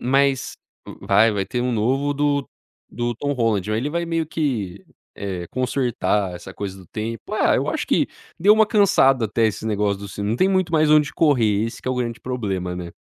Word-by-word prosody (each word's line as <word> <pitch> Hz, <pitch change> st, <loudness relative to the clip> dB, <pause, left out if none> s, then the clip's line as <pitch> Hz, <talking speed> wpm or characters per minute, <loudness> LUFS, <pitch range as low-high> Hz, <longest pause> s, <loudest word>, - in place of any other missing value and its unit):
Mas, 135 Hz, +1 st, +1 dB, 0.5 s
va 105 Hz, +3 st, +4 dB
vai 100 Hz, -2 st, -2 dB
ter 125 Hz, -, -2 dB
um 125 Hz, -, 0 dB
novo 135 Hz, +6 st, +1 dB
do 145 Hz, -1 st, 0 dB, 0.5 s
do 120 Hz, 0 st, -2 dB
Tom 145 Hz, +5 st, -2 dB
Holland, 110 Hz, -6 st, 0 dB
aí 110 Hz, -, 0 dB
ele 130 Hz, +6 st, -1 dB
vai 170 Hz, +2 st, -1 dB
meio 165 Hz, -1 st, -1 dB
que, 110 Hz, -, -3 dB, 0.3 s
eh, 95 Hz, -3 st, -4 dB
consertar 120 Hz, -7 st, 0 dB
essa 95 Hz, +2 st, -9 dB
coisa 95 Hz, -1 st, -6 dB
do 95 Hz, -, -14 dB
tempo. 110 Hz, +1 st, -5 dB
É, -, -, +3 dB
eu -, -, -1 dB
acho -, -, -2 dB
que -, -, +2 dB, 0.3 s
deu 200 Hz, +5 st, +6 dB
uma 220 Hz, 0 st, +5 dB
cansada 195 Hz, -, +4 dB
até 115 Hz, +2 st, +1 dB
esse 110 Hz, 0 st, -3 dB
negócio 105 Hz, -2 st, 0 dB
do 100 Hz, -, -7 dB
cine 100 Hz, +2 st, -4 dB
não 115 Hz, -, 0 dB
tem 185 Hz, -, +3 dB
muito 185 Hz, -3 st, +1 dB
mais 155 Hz, -1 st, +3 dB
onde 150 Hz, -1 st, +4 dB
correr, 115 Hz, -9 st, +2 dB
esse 115 Hz, -, -8 dB
que -, -, -5 dB
é -, -, +1 dB
o -, -, -1 dB
grande 120 Hz, -2 st, -3 dB
problema, 95 Hz, -8 st, -3 dB
né. 85 Hz, -1 st, -6 dB
120 Hz, 210 wpm, -22 LUFS, 105-145 Hz, 0.5 s, deu